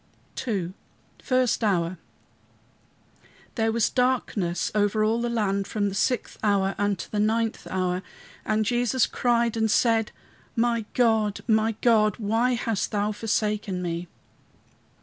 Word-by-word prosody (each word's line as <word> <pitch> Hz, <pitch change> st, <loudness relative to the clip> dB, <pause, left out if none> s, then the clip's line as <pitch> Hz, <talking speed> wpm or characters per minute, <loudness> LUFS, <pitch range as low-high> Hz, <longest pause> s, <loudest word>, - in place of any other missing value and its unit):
II 190 Hz, -6 st, -2 dB, 0.5 s
FIRST 255 Hz, -3 st, +1 dB
HOUR 180 Hz, -4 st, 0 dB, 1.5 s
"There 225 Hz, -1 st, +1 dB
was 230 Hz, -1 st, +1 dB
darkness 230 Hz, -9 st, 0 dB
over 210 Hz, 0 st, +2 dB
all 225 Hz, +2 st, +1 dB
the 240 Hz, -, -1 dB
land 200 Hz, -4 st, 0 dB
from 205 Hz, -2 st, -1 dB
the -, -, -6 dB
sixth 250 Hz, +5 st, -1 dB
hour 195 Hz, -2 st, +2 dB
unto 205 Hz, -3 st, -1 dB
the 210 Hz, -, -1 dB
ninth 225 Hz, +1 st, 0 dB
hour. 185 Hz, -1 st, -1 dB, 0.4 s
"And 215 Hz, 0 st, 0 dB
Jesus 245 Hz, +1 st, +2 dB
cried 235 Hz, -2 st, +1 dB
and 220 Hz, -1 st, +1 dB
said, 225 Hz, -1 st, +2 dB, 0.4 s
My 235 Hz, -1 st, +1 dB
God, 220 Hz, -4 st, +2 dB
my 220 Hz, -1 st, +2 dB
God, 215 Hz, -4 st, +3 dB
why 225 Hz, +4 st, +1 dB
hast 230 Hz, -4 st, -1 dB
thou 210 Hz, 0 st, 0 dB
forsaken 210 Hz, -3 st, -1 dB
me?" 170 Hz, 0 st, -3 dB
215 Hz, 130 wpm, -25 LUFS, 200-230 Hz, 1.5 s, God